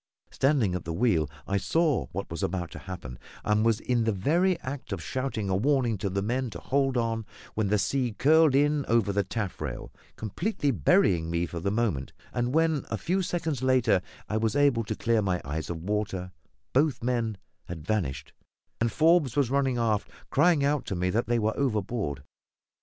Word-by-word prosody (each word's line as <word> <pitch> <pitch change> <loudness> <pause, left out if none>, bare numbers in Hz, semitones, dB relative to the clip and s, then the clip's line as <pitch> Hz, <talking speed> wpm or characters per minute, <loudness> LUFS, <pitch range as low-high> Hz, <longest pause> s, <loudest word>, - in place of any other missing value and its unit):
Standing 130 -9 +2
at 90 -2 -3
the 85 - -4
wheel, 85 -6 +2 0.2
I 100 - 0
saw 160 - +1
what 100 0 -5
was 85 - -4
about 85 -1 -2
to - - -8
happen, 75 -10 -8 0.2
and 105 0 +2
was 115 -1 +3
in 120 -2 0
the 110 - +2
very 170 - +2
act 135 +1 -6
of - - -2
shouting 130 -6 -2
a 95 - +1
warning 125 +1 +2
to 100 - -1
the 100 +1 -1
men 125 +4 -1
to 90 -6 -8
hold 135 +2 +1
on, 115 -1 0 0.3
when 110 -2 0
the 105 +2 +2
sea 125 +2 0
curled 155 +4 +4
in 145 +1 +3
over 115 -3 +2
the 100 0 +2
taffrail, 100 0 -5 0.2
completely 145 - -1
burying 85 - +3
me 85 +1 0
for 85 0 -6
the 95 +4 -1
moment; 100 - -1 0.2
and 120 0 0
when, 160 -3 +2
a 110 - -1
few 180 - 0
seconds 165 -6 -2
later, 130 -7 +3 0.3
I 110 - -1
was 110 +3 0
able 140 -5 +3
to - - -3
clear 115 -1 +1
my 95 -3 0
eyes 75 +3 -4
of 80 -2 -5
water, 100 -2 -2 0.4
both 140 -2 +2
men 120 -4 0 0.3
had 80 -3 -7
vanished, 90 -10 -2 0.5
and 115 0 +1
Forbes 155 -4 +3
was 140 -4 +2
running 135 -2 +1
aft, 110 -3 0 0.2
crying 150 0 +4
out 145 -1 +1
to 95 - -2
me 90 +1 0
that 115 +4 0
they 120 0 +2
were 110 -1 0
overboard. 105 - -1
115 Hz, 190 wpm, -28 LUFS, 95-135 Hz, 0.5 s, curled